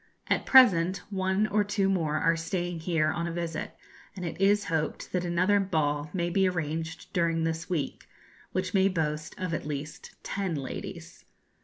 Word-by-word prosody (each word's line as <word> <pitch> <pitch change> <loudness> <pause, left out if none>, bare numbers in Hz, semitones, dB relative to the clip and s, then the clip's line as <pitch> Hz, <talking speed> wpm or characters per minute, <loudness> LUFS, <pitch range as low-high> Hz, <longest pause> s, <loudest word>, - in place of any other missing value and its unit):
At - - +1
present 185 -8 +6
one 190 +1 +1
or 210 0 +2
two 200 -1 0
more 165 -6 +1
are 165 +2 +3
staying 175 +1 -3
here 160 -2 +1
on 170 0 -2
a - - -3
visit, 170 -1 -4 0.4
and 180 -2 -5
it 170 +2 -5
is 205 +1 +4
hoped 160 -4 -2
that 180 -1 0
another 185 +4 +2
ball 150 -6 0
may 175 0 -1
be 190 0 +3
arranged 160 -1 -4
during 165 -2 +1
this 160 +1 -2
week, 155 -7 -3 0.4
which 185 0 -2
may 195 -1 +4
boast 155 -4 -2
of 185 -2 -2
at 150 - -3
least 150 +1 -6
ten 195 -4 -2
ladies. 135 -3 -7
170 Hz, 170 wpm, -28 LUFS, 160-190 Hz, 0.4 s, present